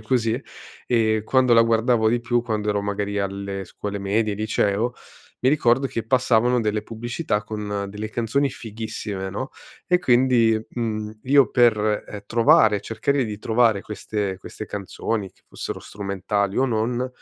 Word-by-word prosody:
così. 115 +1 0 0.5
E 110 -2 +2
quando 130 0 +3
la 115 0 +7
guardavo 115 0 +3
di 120 +2 +1
più, 120 0 0
quando 105 -3 -2
ero 105 -1 +1
magari 100 0 -2
alle 100 0 -3
scuole 100 +2 -5
medie, 105 +2 0
liceo, 110 +2 0 0.5
mi 130 - +3
ricordo 135 -2 +3
che 115 -3 -4
passavano 125 0 +3
delle 105 -1 -1
pubblicità 115 -1 -3
con 105 -2 -4
delle 105 +2 -5
canzoni 120 +6 0
fighissime, 105 -4 -5
no, 130 +7 -4 0.4
e 180 0 +3
quindi, 120 -6 +4
mhmm, 110 -2 -4
io 140 +1 +5
per, 120 -3 +4 0.3
ehm, 105 -1 -7
trovare 110 -2 +5
ehm, 100 - -4
cercare 135 +4 0
di 105 -2 -5
trovare 110 -2 +2
queste 105 -2 -3
queste 110 - -8
canzoni 100 +1 -3
che - - -33
fossero - - -6
strumentali 100 0 -2
o 130 - +4
non, 120 +1 0
110 Hz, 155 wpm, -23 LUFS, 105-120 Hz, 0.5 s, la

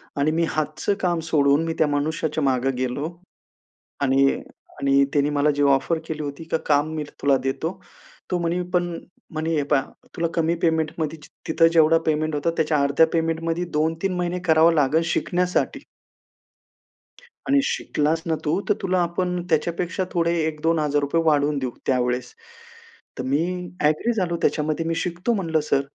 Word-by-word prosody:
आणि 145 +2 +1
मी 165 +1 +1
हातच 155 +4 -3
काम 175 -2 +1
सोडून, 145 0 +3
मी 165 - -2
त्या 155 - +3
मनुष्याच्या 155 +1 -1
मागं 135 0 +1
गेलो. 130 +5 -2 0.9
आणि 135 0 +3 0.5
आणि 140 0 +4
त्यानी 145 0 +2
मला 145 +1 +2
जी 145 - +1
ऑफर 140 +4 +2
केली 155 -1 -4
होती, 145 +2 -6
का 160 - -1
काम 145 +1 +3
मी 155 -1 -3 0.2
तुला 140 -1 +4
देतो. 160 +7 -3 0.5
तो 180 - +1
म्हणी 170 +1 -1
पण 175 -1 0 0.3
म्हणी, 160 +1 -1
"हे 145 - +1
पहा, 140 -1 +2 0.3
तुला 170 -1 0
कमी 165 0 +1
पेमेंटमध्ये 160 -1 0
जी - - -14 0.2
तिथं 165 +1 +4
जेवढं 165 0 +5
पेमेंट 155 0 0
होता, 150 +3 0
त्याच्या 155 -1 +1
अर्ध्या 140 +3 +4
पेमेंटमध्ये 165 +1 -1
2-3 165 +5 0
महिने 180 0 -1
करावं 160 +1 +6
लागेल, 150 +2 +3
शिकण्यासाठी." 180 +1 0 1.6
"आणि 280 +1 +4
शिकलास 160 - 0
ना 160 - +1
तू, 165 +6 +1
तर - - +6
तुला 185 -1 +1
आपण 180 +1 -1
त्याच्यापेक्षा 170 +4 0
थोडे 170 0 +1
₹1000-₹2000 155 -1 0
वाढवून 150 -2 +2
देऊ, 130 -2 -2 0.2
त्यावेळेस." 125 -1 0 0.8
तर 130 - -3
मी 140 +5 +1 0.4
ॲग्री 155 +11 +2
झालो 180 -5 -1
त्याच्यामध्ये, 155 +1 0
मी 165 0 -1
शिकतो 175 +7 -1
म्हणलं 165 -6 0
सर. 140 - +3
160 Hz, 155 wpm, -23 LUFS, 145-170 Hz, 1.6 s, करावं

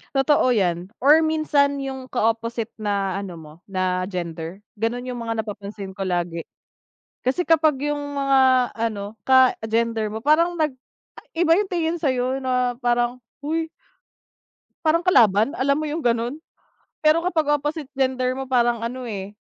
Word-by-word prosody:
Totoo 270 -2 +3
'yan 180 -1 -1
or 300 +4 +6
minsan 290 -3 +1
yung 265 -1 -5
ka-opposite 230 -1 -1
na 200 -3 -1
ano 195 -3 -5
mo 155 -2 -12
na 185 -2 -1
gender 170 -1 -5 0.2
gano'n 245 +3 -2
yung 245 - -4
mga 225 -1 -2
napapansin 205 -2 -7
ko 190 0 -5
lagi. 175 -2 -2 0.8
Kasi 260 +7 +1
kapag 310 -4 +3
yung 290 -1 -3
mga 260 -2 +4
ano 215 -2 -3
ka-gender 230 -4 +2
mo 220 - -4
parang 315 +6 +3
nag 300 -4 0 0.6
ay 330 - -4
iba 330 0 +5
yung 410 -1 0
tingin 335 -1 0
sa'yo 260 -3 0
na 250 -2 0
parang, 240 0 +1 0.2
"Hoy." 320 +2 -2 1.2
Parang 320 +2 +4
kalaban 225 - +4
alam 280 +1 +1
mo 310 - -2
yung 310 +2 -3
gano'n. 235 +2 0 0.6
Pero 310 +2 +3
kapag 330 -4 0
opposite 295 +1 -3
gender 260 -1 0
mo 265 0 -6
parang 240 -2 +2
ano, 250 +2 -4
eh, 205 -1 -6
250 Hz, 150 wpm, -23 LUFS, 210-285 Hz, 1.2 s, or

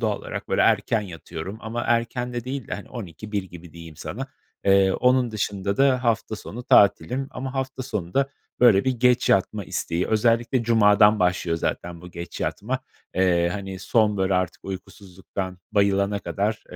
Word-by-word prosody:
doğal 110 -3 0
olarak - - -7
böyle - - +1
erken 115 - +3
yatıyorum 90 0 -7
ama 115 +2 -4
erken 120 +1 0
de 120 -1 -4
değil 130 0 -4
de - - -5
12.00-1.00 105 -1 -5
gibi 90 -3 -12
diyeyim 85 -2 -11
sana. - - -5 0.4
Eee, 95 -1 +5
onun 125 +1 +2
dışında 100 -2 -2
da 130 -2 +3
hafta 115 -1 0
sonu 120 +3 -8
tatilim 120 +6 +4
ama 130 +1 -6
hafta 130 -1 -3
sonu 100 -8 -5
da 135 0 +2 0.3
böyle 110 -6 +6
bir 130 - +2
geç 125 0 +2
yatma 100 +1 +2
isteği 85 +2 -2
özellikle 115 +3 +2
cumadan 105 -2 +5
başlıyor 90 -2 +1
zaten 85 +1 -3
bu 90 +1 -11
geç 85 0 -8
yatma, 125 +6 -2 0.4
eee, 90 -2 +3
hani 95 -1 -5
son 105 +1 +2
böyle 95 0 +1
artık 90 -1 -2
uykusuzluktan 95 -1 -7
bayılana 100 0 +2
kadar 105 +2 -2
105 Hz, 160 wpm, -24 LUFS, 95-120 Hz, 0.4 s, böyle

